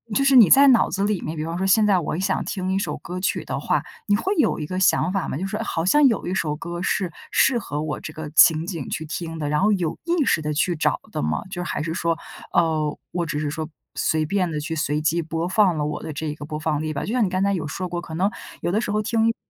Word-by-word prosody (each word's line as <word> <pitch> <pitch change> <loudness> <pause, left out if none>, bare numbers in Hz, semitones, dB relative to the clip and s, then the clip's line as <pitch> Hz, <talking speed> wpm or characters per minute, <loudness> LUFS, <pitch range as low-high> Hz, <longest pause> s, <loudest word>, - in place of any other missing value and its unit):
就 275 - +3
是 275 -1 +4
你 210 -8 +8
在 280 +1 +8
脑 240 - +4
子 195 - -1
里 205 -3 0
面， 155 +2 -4
比 155 - -2
方 165 +1 -4
说 190 - -1
现 210 +3 +5
在 195 -3 +4
我 155 -1 -3
想 190 - 0
听 185 -2 -3
一 195 - +1
首 - - -3
歌 180 +2 -6
曲 190 - -1
的 - - -3
话， - - 0 0.2
你 205 - +4
会 375 - 0
有 300 - +2
一 150 - -3
个 185 +4 -3
想 185 -2 +3
法 195 -2 -1
吗？ - - -3
就 190 - -3
是 210 +2 -3
好 165 -7 -2
像 295 +9 +5
有 225 - 0
一 180 - -2
首 155 -5 -1
歌 170 +3 -6
是 180 -2 0 0.2
适 265 -3 +4
合 150 -7 -4
我 155 -1 -3
这 155 - -7
个 155 -1 -6
情 160 +1 +6
景 170 -7 -5
去 160 - -3
听 165 +1 -5
的， 145 -1 -2
然 150 - +1
后 210 +1 +4
有 170 -5 -1
意 340 -3 +2
识 160 - +2
地 150 0 -2
去 170 +4 +1
找 - - +1
的 - - -3
吗？ 75 +1 -1
就 175 -1 -4
还 165 - -3
是 160 +1 -3
说， 170 -1 0 0.4
呃， 155 -3 +1
我 175 -1 -1
只 150 -2 -3
是 150 -1 -2
说 155 +1 -4 0.3
随 155 -1 +1
便 180 +1 0
地 150 - -2
去 160 +2 -4
随 150 -1 0
机 160 +2 +1
播 165 +1 -3
放 190 -3 +3
了 150 - -1
我 150 - -4
的 160 - -5
这 150 +1 -4
个 145 - -8
播 150 0 -5
放 155 -2 -1
列 155 0 -3
表。 140 - -3
就 220 - -3
像 250 -3 +3
你 190 - +1
刚 185 0 -1
才 200 0 +2
有 170 -5 -2
说 180 +5 -4
过， 175 0 -4
可 165 - -9
能 185 +5 +1 0.3
有 - - -2
的 215 - +2
时 240 - -2
候 210 +1 +1
听 225 +1 +1
一 - - +4
首 - - -9
170 Hz, 315 characters per minute, -23 LUFS, 155-195 Hz, 0.4 s, 你